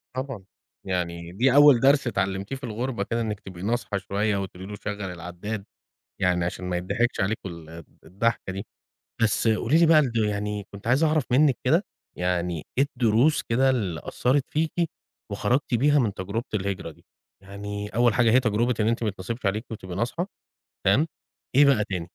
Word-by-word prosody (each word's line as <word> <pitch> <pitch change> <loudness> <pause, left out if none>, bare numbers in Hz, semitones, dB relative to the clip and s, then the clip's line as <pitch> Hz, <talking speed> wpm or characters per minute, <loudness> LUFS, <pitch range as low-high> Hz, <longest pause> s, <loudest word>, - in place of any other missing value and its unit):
طبعًا. 130 -6 -4 0.4
يعني 85 -2 -3
دي 125 +7 +2
أول 145 -4 +8
درس 135 0 +4
اتعلّمتيه 100 +2 -2
في 135 - -11
الغربة 115 -1 -2
كده، 115 +2 -2
إنِّك 105 -2 -3
تبقي 90 -2 -10
ناصحة 115 -2 -1
شوية 100 +2 -1
وتقولي 95 -1 -6
له 105 - -6
شَغّل 105 0 -5
العداد 90 +4 -6 0.6
يعني 90 -1 +2
عشان 90 +1 -4
ما 90 -1 -1
يتضحكش 115 +7 -1
عليكم 95 -1 -2
ال 85 -1 -10 0.2
الضحكة 95 +3 -1
دي. 95 - -5 0.6
بس 115 +1 +2
قولي 115 +6 +3
لي 170 - +6
برضه 135 -9 +4
يعني 105 0 -3
كنت 100 +3 -9
عايز 130 +6 +3
أعرف 155 -3 +2
منِّك 135 0 +4
كده 165 +10 +3 0.3
يعني 90 -2 -1
إيه 135 - +5
الدروس 120 +5 +3
كده 130 +3 +2
اللي 100 - -1
أثّرت 130 +2 +1
فيكِ 155 +1 0 0.6
وخرجتي 120 +4 0
بيها 145 +4 +4
من 110 -6 +1
تجربة 100 +5 -4
الهجرة 95 -4 -2
دي؟ - - -22 0.4
يعني 100 +1 -6
أول 120 0 +3
حاجة 115 -1 +4
هي 130 - +6
تجربة 120 0 +1
إن 105 - +2
أنتِ 115 0 0
ميتنصبش 105 +2 -4
عليكِ 105 +4 0
وتبقي 95 -5 -7
ناصحة، 125 - -2 0.6
تمام؟ 130 +12 +4 0.5
إيه 145 - +7
بقى 135 -7 +4
تاني؟ 90 -5 -4
105 Hz, 170 wpm, -25 LUFS, 95-125 Hz, 0.6 s, أول